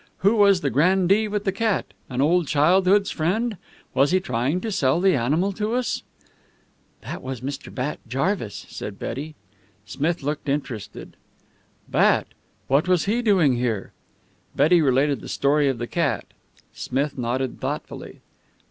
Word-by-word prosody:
"Who 205 Hz, +3 st, +5 dB
was 200 Hz, -4 st, +5 dB
the 140 Hz, -, 0 dB
grandee 190 Hz, -, +3 dB
with 205 Hz, 0 st, -2 dB
the 195 Hz, -, +1 dB
cat? 215 Hz, +1 st, -1 dB, 0.2 s
An 130 Hz, 0 st, -1 dB
old 165 Hz, +2 st, +3 dB
childhood's 185 Hz, +7 st, +3 dB
friend? 210 Hz, +7 st, -1 dB, 0.4 s
Was 135 Hz, +2 st, +3 dB
he 185 Hz, -, +3 dB
trying 135 Hz, 0 st, -1 dB
to 225 Hz, -, -3 dB
sell 135 Hz, -4 st, +2 dB
the 190 Hz, +1 st, +4 dB
animal 150 Hz, +11 st, +1 dB
to 215 Hz, +4 st, -2 dB
us?" 250 Hz, -1 st, -1 dB, 1.0 s
"That -, -, -7 dB
was 130 Hz, -2 st, -6 dB
Mr. 140 Hz, +2 st, -6 dB
Bat 135 Hz, +3 st, -3 dB
Jarvis," 135 Hz, -, -2 dB
said 100 Hz, -1 st, -7 dB
Betty. 150 Hz, +5 st, -5 dB, 0.5 s
Smith 155 Hz, +6 st, -2 dB
looked 145 Hz, +1 st, -3 dB
interested. 135 Hz, -7 st, -4 dB, 0.7 s
"Bat! -, -, +2 dB, 0.4 s
What 140 Hz, +6 st, +2 dB
was 180 Hz, -2 st, +2 dB
he 225 Hz, +5 st, +1 dB
doing 180 Hz, -, +3 dB
here?" 115 Hz, -5 st, -2 dB, 0.6 s
Betty 160 Hz, +5 st, +4 dB
related 140 Hz, 0 st, +2 dB
the -, -, -9 dB
story 145 Hz, +1 st, +2 dB
of 130 Hz, -, -1 dB
the 120 Hz, -, -3 dB
cat. 160 Hz, +3 st, -1 dB, 0.5 s
Smith 140 Hz, +3 st, -2 dB
nodded 125 Hz, +1 st, -2 dB
thoughtfully. -, -, -5 dB
150 Hz, 150 wpm, -23 LUFS, 135-190 Hz, 1.0 s, Who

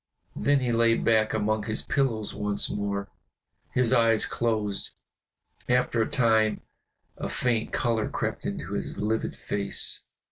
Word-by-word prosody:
Then 140 Hz, -1 st, +2 dB
he 125 Hz, -2 st, 0 dB
lay 115 Hz, 0 st, +4 dB
back 110 Hz, -2 st, +2 dB
among 110 Hz, -1 st, 0 dB
his 110 Hz, -, 0 dB
pillows 115 Hz, -7 st, 0 dB
once 105 Hz, 0 st, +1 dB
more, 100 Hz, -1 st, -2 dB, 0.7 s
his 125 Hz, -1 st, +3 dB
eyes 115 Hz, -2 st, +4 dB
closed. 110 Hz, -4 st, -1 dB, 0.7 s
After 125 Hz, -2 st, +2 dB
a 110 Hz, -, 0 dB
time 110 Hz, -3 st, +2 dB, 0.6 s
a -, -, -4 dB
faint 120 Hz, -3 st, 0 dB
color 115 Hz, -3 st, 0 dB
crept -, -, -3 dB
into -, -, -4 dB
his -, -, -3 dB
livid 110 Hz, +2 st, -1 dB
face. 100 Hz, -1 st, -1 dB
110 Hz, 135 wpm, -27 LUFS, 105-120 Hz, 0.7 s, lay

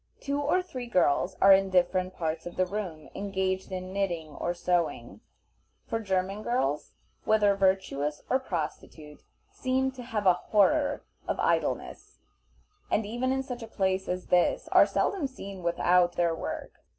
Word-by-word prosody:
Two 280 Hz, +1 st, -2 dB
or 360 Hz, +6 st, +2 dB
three 255 Hz, -9 st, -7 dB
girls 180 Hz, -4 st, +2 dB
are 195 Hz, 0 st, +9 dB
in 195 Hz, 0 st, +3 dB
different 185 Hz, 0 st, +1 dB
parts 160 Hz, -1 st, -3 dB
of 175 Hz, -, -8 dB
the 185 Hz, -, +2 dB
room 180 Hz, -5 st, -5 dB
engaged 190 Hz, -1 st, -2 dB
in 185 Hz, 0 st, -5 dB
knitting 175 Hz, -5 st, -2 dB
or 150 Hz, +3 st, -3 dB
sewing; 175 Hz, -1 st, -1 dB, 0.6 s
for 225 Hz, -, -2 dB
German 195 Hz, -1 st, -1 dB
girls, 150 Hz, -, -1 dB, 0.3 s
whether 210 Hz, -2 st, +4 dB
virtuous 190 Hz, -7 st, 0 dB
or 260 Hz, -, +2 dB
prostitute, 155 Hz, -, -6 dB, 0.3 s
seem 260 Hz, 0 st, 0 dB
to 260 Hz, -1 st, -10 dB
have 225 Hz, -4 st, -3 dB
a 185 Hz, -, +7 dB
horror 285 Hz, -, +2 dB, 0.2 s
of -, -, -2 dB
idleness, -, -, -1 dB, 0.7 s
and 215 Hz, -, +1 dB
even 240 Hz, +5 st, -1 dB
in 265 Hz, 0 st, 0 dB
such 250 Hz, -2 st, -6 dB
a 225 Hz, -, -7 dB
place 190 Hz, -3 st, -1 dB
as 180 Hz, 0 st, -3 dB
this -, -, +2 dB
are -, -, +6 dB
seldom 370 Hz, -8 st, 0 dB
seen 200 Hz, -7 st, -9 dB
without 175 Hz, +1 st, +3 dB
their 170 Hz, -1 st, +1 dB
work. 165 Hz, -, -6 dB
190 Hz, 155 wpm, -28 LUFS, 175-240 Hz, 0.7 s, are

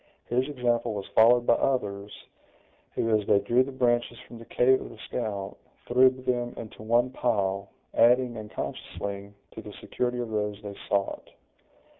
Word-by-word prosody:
His 125 Hz, +2 st, +1 dB
example 120 Hz, -4 st, 0 dB
was 100 Hz, -1 st, -4 dB
followed 120 Hz, +2 st, +6 dB
by -, -, +5 dB
others, 105 Hz, -6 st, -1 dB, 0.8 s
who, 115 Hz, -1 st, +2 dB
as 105 Hz, -2 st, -1 dB
they -, -, +5 dB
drew 120 Hz, +5 st, +2 dB
the 140 Hz, -, -7 dB
branches 120 Hz, -2 st, +1 dB
from 120 Hz, -2 st, -12 dB
the 115 Hz, -, -11 dB
cave 130 Hz, +3 st, +3 dB
of -, -, -8 dB
the -, -, -13 dB
scout, 100 Hz, -5 st, -4 dB, 0.3 s
threw 130 Hz, +2 st, +6 dB
them 125 Hz, -2 st, -3 dB
into 110 Hz, -2 st, -9 dB
one 120 Hz, +3 st, +2 dB
pile, 100 Hz, -6 st, -1 dB, 0.2 s
adding, 125 Hz, 0 st, +4 dB
unconsciously, 100 Hz, -2 st, -6 dB, 0.2 s
to -, -, -8 dB
the -, -, -10 dB
security 125 Hz, 0 st, -3 dB
of 120 Hz, -2 st, -4 dB
those 105 Hz, -1 st, -2 dB
they 100 Hz, -1 st, -7 dB
sought. 100 Hz, -1 st, -1 dB
120 Hz, 160 wpm, -27 LUFS, 105-125 Hz, 0.8 s, followed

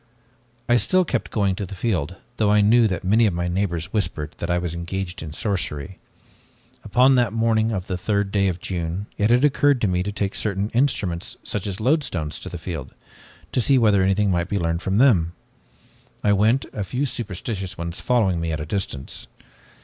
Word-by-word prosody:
"I 120 Hz, 0 st, +4 dB
still 185 Hz, +8 st, +3 dB
kept 130 Hz, -7 st, -2 dB
going 100 Hz, -3 st, +1 dB
to 100 Hz, +2 st, -4 dB
the 100 Hz, -, -8 dB
field, 90 Hz, -4 st, -1 dB, 0.2 s
though 105 Hz, -2 st, +2 dB
I 105 Hz, 0 st, +5 dB
knew 115 Hz, +3 st, +5 dB
that 90 Hz, -4 st, -3 dB
many 110 Hz, +5 st, +4 dB
of 95 Hz, -, -1 dB
my 85 Hz, 0 st, -1 dB
neighbors 85 Hz, -2 st, -2 dB
whispered 80 Hz, -8 st, -1 dB
that 85 Hz, -, -3 dB
I 85 Hz, -, +2 dB
was 85 Hz, -2 st, -2 dB
engaged 90 Hz, +2 st, -4 dB
in 80 Hz, -1 st, -6 dB
sorcery. 90 Hz, -2 st, -3 dB, 0.8 s
Upon 130 Hz, +2 st, +4 dB
that 120 Hz, -4 st, +2 dB
morning 115 Hz, 0 st, +2 dB
of 95 Hz, -4 st, -3 dB
the 90 Hz, -2 st, -3 dB
third 100 Hz, 0 st, 0 dB
day 100 Hz, -1 st, +2 dB
of 90 Hz, -2 st, -2 dB
June, 90 Hz, +2 st, -3 dB
it 105 Hz, +1 st, +3 dB
had 125 Hz, +4 st, +5 dB
occurred 145 Hz, -1 st, +3 dB
to 105 Hz, -, +2 dB
me 90 Hz, -1 st, +1 dB
to 100 Hz, +3 st, -3 dB
take 100 Hz, -1 st, -2 dB
certain 100 Hz, 0 st, -2 dB
instruments, 110 Hz, -10 st, -1 dB
such 105 Hz, -1 st, -3 dB
as 95 Hz, -2 st, -4 dB
loadstones, 110 Hz, -, 0 dB
to -, -, -8 dB
the 90 Hz, -, -6 dB
field, 80 Hz, -5 st, -6 dB, 0.6 s
to 125 Hz, -, +1 dB
see 135 Hz, +3 st, +4 dB
whether 105 Hz, -5 st, +4 dB
anything 95 Hz, +1 st, +2 dB
might 85 Hz, 0 st, 0 dB
be 100 Hz, -, 0 dB
learned 85 Hz, -1 st, -1 dB
with 95 Hz, +2 st, 0 dB
them. 95 Hz, -10 st, +4 dB, 0.9 s
I 105 Hz, -, +4 dB
went, 110 Hz, +6 st, +3 dB
a 105 Hz, -, -2 dB
few 125 Hz, +9 st, -2 dB
superstitious 100 Hz, -5 st, -4 dB
ones 85 Hz, +1 st, -5 dB
following 105 Hz, -9 st, +2 dB
me 85 Hz, 0 st, -2 dB
at 80 Hz, -, -2 dB
a 75 Hz, -, -4 dB
distance. 80 Hz, -6 st, -4 dB
100 Hz, 200 wpm, -23 LUFS, 85-110 Hz, 0.9 s, I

